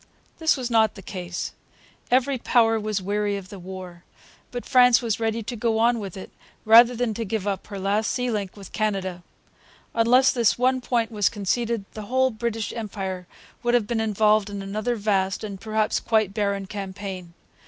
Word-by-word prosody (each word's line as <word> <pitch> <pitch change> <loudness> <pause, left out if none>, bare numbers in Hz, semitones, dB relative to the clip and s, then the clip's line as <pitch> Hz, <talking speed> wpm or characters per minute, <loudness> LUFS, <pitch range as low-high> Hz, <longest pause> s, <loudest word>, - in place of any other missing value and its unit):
This 320 -2 +3
was 250 -2 -4
not 220 -2 +3
the 195 - -11
case. 180 -1 -5 0.6
Every 260 +1 +2
power 225 -2 +3
was 210 -2 -2
weary 205 +1 0
of 190 -2 -9
the 200 - -9
war. 180 -1 -9 0.5
But 245 -1 -6
France 250 -2 +6
was 230 -3 -2
ready 225 0 -1
to 235 +3 -5
go 225 0 0
on 235 +1 +3
with 195 -3 -7
it 190 - -9 0.3
rather 235 +2 +7
than 240 -2 -1
give 220 -2 -3
up 200 -2 -3
her 200 - -7
last 200 +3 0
sea 250 -1 -1
link 205 -3 -3
with 195 -2 -11
Canada. 195 -4 -2 0.7
Unless 245 +3 +5
this 235 -4 +2
one 255 +1 +2
point 235 -2 0
was 210 -3 +2
conceded 225 +1 -1
the 215 - -7
whole 260 +2 +2
British 225 -1 -3
Empire 190 -5 -5 0.3
would 240 0 +2
have 235 -3 +2
been 225 +1 -1
involved 215 -1 +2
in 200 -1 -5
another 215 +5 -2
vast, 195 -3 0
and 200 -2 -6
perhaps 215 -1 0
quite 215 -4 +1
barren, 200 -2 -1
campaign. 190 -3 -7
215 Hz, 180 wpm, -24 LUFS, 195-235 Hz, 0.7 s, rather